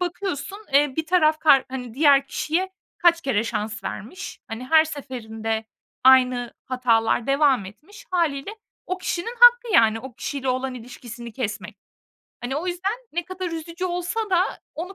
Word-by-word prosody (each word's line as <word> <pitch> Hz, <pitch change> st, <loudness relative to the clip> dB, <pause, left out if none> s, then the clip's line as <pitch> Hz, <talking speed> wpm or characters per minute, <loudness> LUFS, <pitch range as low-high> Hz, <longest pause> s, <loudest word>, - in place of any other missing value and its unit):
bakıyorsun, 360 Hz, -1 st, -4 dB
eee, 285 Hz, 0 st, +4 dB
bir 320 Hz, 0 st, -1 dB
taraf 315 Hz, -3 st, +3 dB
kar 280 Hz, -5 st, +5 dB
hani, 250 Hz, -3 st, -6 dB
diğer 280 Hz, -1 st, +5 dB
kişiye 355 Hz, +7 st, -1 dB, 0.3 s
kaç 345 Hz, -3 st, +4 dB
kere 250 Hz, -8 st, 0 dB
şans 220 Hz, -1 st, -4 dB
vermiş, 355 Hz, -, -7 dB
hani, 225 Hz, +3 st, -6 dB
her 315 Hz, +3 st, +6 dB
seferinde 225 Hz, -7 st, -5 dB, 0.4 s
aynı 255 Hz, -2 st, +5 dB
hatalar 240 Hz, -3 st, +1 dB
devam 275 Hz, -5 st, +3 dB
etmiş. 310 Hz, -, -13 dB
Hâliyle 330 Hz, -3 st, 0 dB, 0.4 s
o 370 Hz, +1 st, -3 dB
kişinin 370 Hz, +6 st, -3 dB
hakkı 485 Hz, -1 st, +7 dB
yani 225 Hz, -1 st, +5 dB
o 265 Hz, +1 st, -9 dB
kişiyle 270 Hz, +2 st, -4 dB
olan 255 Hz, +1 st, -1 dB
ilişkisini 235 Hz, -1 st, -9 dB
kesmek. 215 Hz, -4 st, -5 dB, 0.6 s
Hani, 255 Hz, +2 st, -3 dB
o 325 Hz, +5 st, -3 dB
yüzden 365 Hz, +3 st, -1 dB, 0.2 s
ne 345 Hz, +2 st, -2 dB
kadar 370 Hz, 0 st, -5 dB
üzücü 335 Hz, +2 st, -5 dB
olsa 360 Hz, +4 st, -2 dB
da 360 Hz, -1 st, +4 dB, 0.3 s
onu 360 Hz, +5 st, -6 dB
280 Hz, 155 wpm, -23 LUFS, 245-350 Hz, 0.6 s, hakkı